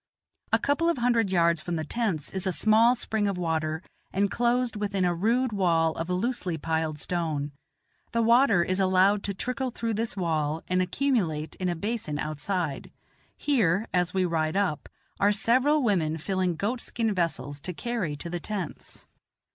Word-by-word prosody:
A - - +5
couple 310 +4 +1
of 340 - +1
hundred 235 -4 +2
yards 170 -3 +3
from 175 +2 -3
the 160 - -2
tents 185 -7 -1
is 190 0 -2
a - - +2
small 220 +5 +4
spring 220 -3 -1
of 200 -2 -1
water, 160 -1 -1 0.3
enclosed 235 +5 +1
within 200 -3 -1
a 175 - +2
rude 230 +8 +1
wall 170 -5 +2
of 165 +2 -5
loosely 185 -2 -1
piled 160 0 -1
stone; 155 -3 -2 0.6
the 230 0 +1
water 230 -5 +5
is 185 +2 -1
allowed 190 +2 +4
to 200 - -3
trickle 250 +4 -2
through 230 -1 -3
this 220 0 -2
wall 160 -3 -1
and 185 0 +1
accumulate 180 - 0
in 185 -1 -1
a 175 - -1
basin 200 -5 -3
outside. 155 +1 -2 0.5
Here, 220 - +1
as 180 -1 +1
we 185 -1 +1
ride 160 0 0
up, 190 -7 -1 0.3
are 205 +1 +4
several 255 +8 +3
women 165 -8 +1
filling 185 +1 -1
goat 215 +9 -2
skin 225 -3 -1
vessels 160 -6 -2
to 180 - -5
carry 195 -5 -3
to 160 +4 -7
the 175 - -2
tents. 190 -2 -6
185 Hz, 170 wpm, -27 LUFS, 165-225 Hz, 0.6 s, A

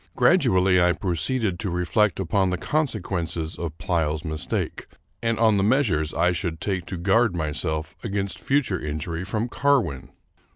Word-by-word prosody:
Gradually 90 0 +4
I 90 0 +4
proceeded 95 +3 -1
to 100 - -2
reflect 90 +4 +1
upon 95 +1 +1
the 90 - -1
consequences 85 - -2
of 80 -2 -5
Pleyel's 80 -3 -1
mistake, 80 -1 -3 0.3
and 115 -1 0
on 110 -2 +4
the 95 - +2
measures 100 - +2
I 90 +2 +2
should 85 -2 -3
take 95 -3 -2
to 90 - -5
guard 100 +3 +2
myself 80 0 -2
against 100 -3 -3
future 130 - 0
injury 80 +3 -4
from 110 +4 -2
Carwin. 125 - +1
90 Hz, 150 wpm, -24 LUFS, 80-105 Hz, 0.3 s, Gradually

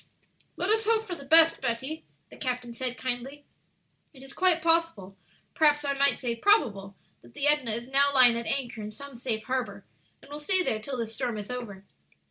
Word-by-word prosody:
"Let 365 +4 -1
us 440 0 +1
hope 445 -1 +2
for 370 - -6
the 325 - -9
best, 325 +3 +5
Betty," 265 +7 -4 0.3
the - - -12
captain 250 -3 -4
said, 250 +1 -4
kindly; 260 +3 -5 0.7
"it 265 -2 -15
is 270 0 -12
quite 365 -3 +2
possible, 330 - +1 0.4
perhaps 295 -2 +2
I 280 - 0
might 280 -1 +2
say 240 -3 -3
probable, 215 - +1 0.3
that 120 0 -19
the - - -1
Edna 295 -5 +2
is 235 +1 -7
now 280 +1 +3
lying 255 -3 +5
at 235 -1 -4
anchor 245 -5 -3
in 210 - -6
some 275 +5 -11
safe 235 -3 -3
harbor, 255 0 -4 0.3
and 280 - -16
will 295 - -6
stay 370 +5 +2
there 220 - -1
till 260 +4 -6
this 225 -2 -4
storm 240 -2 -3
is 210 +3 -7
over." 210 -6 -7
260 Hz, 200 wpm, -27 LUFS, 235-295 Hz, 0.7 s, best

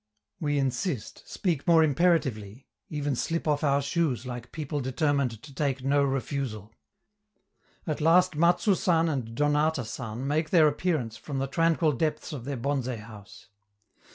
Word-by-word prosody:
We 145 -4 0
insist, 135 - -3
speak 170 -8 -2
more 165 -2 +6
imperatively; 135 - +1 0.2
even 145 -4 -2
slip 165 +6 -2
off 150 -1 +1
our 140 -1 +2
shoes 140 -4 -1
like 120 -1 -7
people 150 -2 -4
determined 130 -3 0
to 145 -2 -12
take 135 -2 -1
no 140 +1 +3
refusal. 135 -6 -3 1.1
At 155 -2 -3
last 175 +2 +4
Matsou 175 +6 +3
San 170 -4 +2
and 120 -6 -3
Donata 150 -2 +1
San 115 +2 -5
make 155 +2 0
their 165 -4 +6
appearance 145 -7 -1
from 140 +3 -6
the 135 - 0
tranquil 165 +2 +2
depths 155 +3 -2
of 125 -5 -6
their 140 -1 -3
bonze 135 +1 -1
house. 105 -5 -9
145 Hz, 150 wpm, -27 LUFS, 125-160 Hz, 1.1 s, more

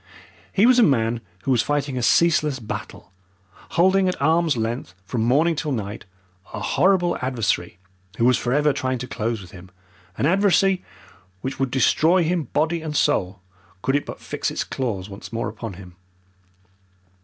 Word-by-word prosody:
He 200 +3 +3
was 250 0 +6
a - - +7
man 120 - +2 0.2
who 135 - 0
was 120 -3 +4
fighting 145 -2 -1
a 125 - -2
ceaseless 155 +1 +3
battle, 110 -5 -7 0.7
holding 190 +2 +4
at 180 - -4
arm's 160 -1 +2
length, 115 -5 -3
from 110 +5 -2
morning 150 +9 +3
till 150 0 -3
night, 105 -4 -4 0.5
a - - -4
horrible 175 - +2
adversary 115 -9 -1 0.4
who 115 - +2
was 125 0 +5
forever 145 +5 +1
trying 130 -1 -1
to 125 +1 -6
close 115 -2 -3
with 90 - -14
him 90 0 -12 0.5
an - - 0
adversary 195 +1 +3 0.6
which 130 +1 -5
would 135 -1 +1
destroy 160 +7 +3
him 165 -1 0
body 160 +6 0
and 155 -2 -3
soul 95 0 0 0.4
could 135 +2 +1
it 145 - -1
but - - -7
fix - - -3
its - - -2
claws 105 -8 -3
once 100 +2 -10
more 115 0 -2
upon 115 -4 -7
him. 90 -1 -12
135 Hz, 165 wpm, -23 LUFS, 115-165 Hz, 0.7 s, a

